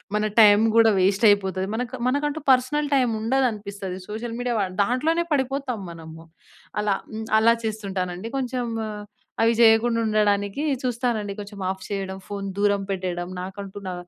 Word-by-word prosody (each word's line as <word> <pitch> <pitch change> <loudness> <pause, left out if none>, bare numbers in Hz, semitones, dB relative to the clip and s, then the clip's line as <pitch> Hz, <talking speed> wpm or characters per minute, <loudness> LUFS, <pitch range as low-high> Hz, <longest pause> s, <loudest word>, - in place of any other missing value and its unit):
మన 210 - +1 0.2
టైం 205 -1 +7 0.2
కూడా 225 -1 +6
వేస్టయిపోతది. 195 -1 +3
మనకు 250 +2 -4
మనకంటూ 290 +3 -1
పర్సనల్ 265 +4 +2
టైమ్ 255 -3 +2
ఉండదనిపిస్తది 210 -6 -1
సోషల్ 225 +2 -5
మీడియా 245 -1 -1 0.3
దాంట్లోనే 310 +10 0
పడిపోతాం 265 -4 -1
మనము. 165 -1 -11 0.6
అలా 205 -2 +1 0.4
అలా 230 +1 +5
చేస్తుంటానండి 195 -2 -4
కొంచెం 250 -1 -2 0.2
ఆహ్, 210 -1 -7 0.4
అవి 230 +1 +4
జేయకుండా 230 0 +5
ఉండడానికి 205 +3 +1 0.2
చూస్తానండి 235 -4 -1
కొంచెం 205 0 -8
ఆఫ్ 190 -1 -5
చేయడం 195 -2 -3
ఫోను 200 -1 -5
దూరం 200 0 +2
పెట్టేయడం 180 -2 -3
నాకంటూ 195 +1 -8
నా - - -4
215 Hz, 130 wpm, -24 LUFS, 195-245 Hz, 0.6 s, టైం